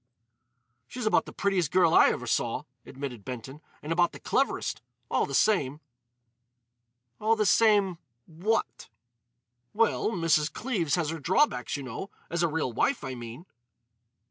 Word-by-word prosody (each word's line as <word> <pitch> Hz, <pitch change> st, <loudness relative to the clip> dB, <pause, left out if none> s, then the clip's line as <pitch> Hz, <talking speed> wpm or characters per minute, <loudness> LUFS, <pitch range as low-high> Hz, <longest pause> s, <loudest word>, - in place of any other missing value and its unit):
"She's 250 Hz, -2 st, -6 dB
about 215 Hz, -, +3 dB
the -, -, -7 dB
prettiest 190 Hz, -6 st, 0 dB
girl 170 Hz, 0 st, +4 dB
I -, -, +7 dB
ever -, -, -3 dB
saw," -, -, -1 dB, 0.2 s
admitted 130 Hz, -5 st, -7 dB
Benton, 130 Hz, +5 st, -8 dB, 0.2 s
"and 150 Hz, -, -5 dB
about 175 Hz, +1 st, +2 dB
the -, -, -10 dB
cleverest. 275 Hz, -, -1 dB, 0.3 s
All -, -, +1 dB
the -, -, -3 dB
same——" 150 Hz, -10 st, +2 dB, 1.4 s
"All 220 Hz, +1 st, +2 dB
the 215 Hz, -1 st, +1 dB
same—what?" 175 Hz, -, 0 dB, 0.8 s
"Well, 225 Hz, 0 st, +2 dB
Mrs. 165 Hz, -6 st, +1 dB
Cleves 190 Hz, -, -1 dB
has 165 Hz, -3 st, -1 dB
her 165 Hz, -, -5 dB
drawbacks, 165 Hz, -, +1 dB
you 140 Hz, -, -6 dB
know—as 170 Hz, -, -6 dB
a 170 Hz, -, +3 dB
real 150 Hz, -6 st, -2 dB
wife, 250 Hz, -, 0 dB
I 130 Hz, -1 st, -4 dB
mean." 120 Hz, +6 st, -9 dB
165 Hz, 140 wpm, -28 LUFS, 135-200 Hz, 1.4 s, I